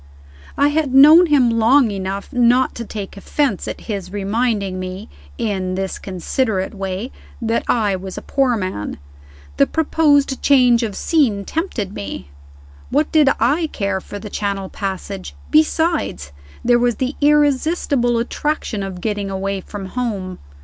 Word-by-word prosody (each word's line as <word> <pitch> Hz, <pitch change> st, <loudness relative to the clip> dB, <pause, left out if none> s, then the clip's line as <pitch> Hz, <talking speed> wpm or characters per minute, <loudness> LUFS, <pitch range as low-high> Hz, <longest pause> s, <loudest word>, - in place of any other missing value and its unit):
I 285 Hz, +1 st, +4 dB
had 295 Hz, -3 st, 0 dB
known 310 Hz, +6 st, +8 dB
him 270 Hz, -6 st, +4 dB
long 240 Hz, +1 st, +4 dB
enough 195 Hz, +4 st, -5 dB
not 245 Hz, +1 st, +3 dB
to 235 Hz, -, -6 dB
take 205 Hz, -3 st, -7 dB
offense 255 Hz, +1 st, -1 dB
at -, -, -6 dB
his 200 Hz, -5 st, -5 dB
reminding 205 Hz, -1 st, -1 dB
me, 185 Hz, -, -6 dB, 0.3 s
in 190 Hz, -4 st, -2 dB
this 190 Hz, 0 st, -3 dB
considerate 190 Hz, +2 st, -2 dB
way, 195 Hz, +4 st, -4 dB, 0.3 s
that 230 Hz, 0 st, -1 dB
I 210 Hz, -5 st, +1 dB
was 190 Hz, 0 st, -7 dB
a -, -, -6 dB
poor 265 Hz, -4 st, +1 dB
man. 185 Hz, -, -4 dB, 0.6 s
The -, -, +4 dB
proposed 290 Hz, -4 st, +2 dB
change 250 Hz, -4 st, +4 dB
of 215 Hz, -4 st, -3 dB
scene 235 Hz, -12 st, +1 dB
tempted 235 Hz, -, -3 dB
me. 100 Hz, -, -7 dB, 0.6 s
What 295 Hz, +3 st, +1 dB
did 305 Hz, -3 st, +5 dB
I 290 Hz, +9 st, +2 dB
care 200 Hz, -2 st, -2 dB
for 205 Hz, -, -8 dB
the 205 Hz, 0 st, -9 dB
Channel 200 Hz, -2 st, -3 dB
passage? 195 Hz, -1 st, -5 dB, 0.2 s
Besides, 315 Hz, -, +1 dB, 0.3 s
there 240 Hz, 0 st, +4 dB
was 240 Hz, -1 st, +1 dB
the 260 Hz, +1 st, -2 dB
irresistible 290 Hz, -3 st, +2 dB
attraction 240 Hz, -2 st, -2 dB
of 190 Hz, -2 st, -6 dB
getting 205 Hz, -1 st, -2 dB
away 195 Hz, 0 st, -3 dB
from 200 Hz, +1 st, -8 dB
home. 195 Hz, -4 st, -4 dB
225 Hz, 145 wpm, -19 LUFS, 195-275 Hz, 0.6 s, known